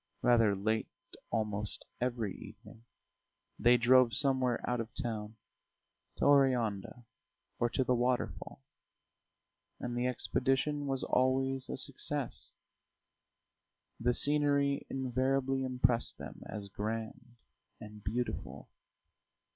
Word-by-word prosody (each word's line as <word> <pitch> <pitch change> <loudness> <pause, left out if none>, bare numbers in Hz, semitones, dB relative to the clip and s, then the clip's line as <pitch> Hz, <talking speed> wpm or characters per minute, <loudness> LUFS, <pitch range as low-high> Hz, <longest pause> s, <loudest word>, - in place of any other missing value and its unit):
Rather 115 -4 +4
late 110 +3 0 0.4
almost 105 -2 -2 0.2
every 120 -6 -1
evening 115 - -13 0.8
they 120 +1 +6
drove 125 0 +5
somewhere 130 -3 +2
out 125 -1 0
of 115 - -6
town, 110 -2 -4 0.8
to - - -1
Oreanda 125 -5 +2 0.5
or 120 - +2
to 130 - 0
the 125 - +1
waterfall; 125 - -1 1.2
and 120 0 -4
the 120 +1 0
expedition 135 +3 0
was 135 -1 0
always 130 +1 +1
a - - -3
success, - - -1 1.5
the 125 +2 +2
scenery 140 +1 +2
invariably 135 +1 0
impressed 125 -2 +1
them - - -9
as 105 -2 -6
grand 115 +4 -5 0.4
and 105 -1 -11
beautiful. 120 +4 -4
125 Hz, 100 wpm, -32 LUFS, 115-130 Hz, 1.5 s, they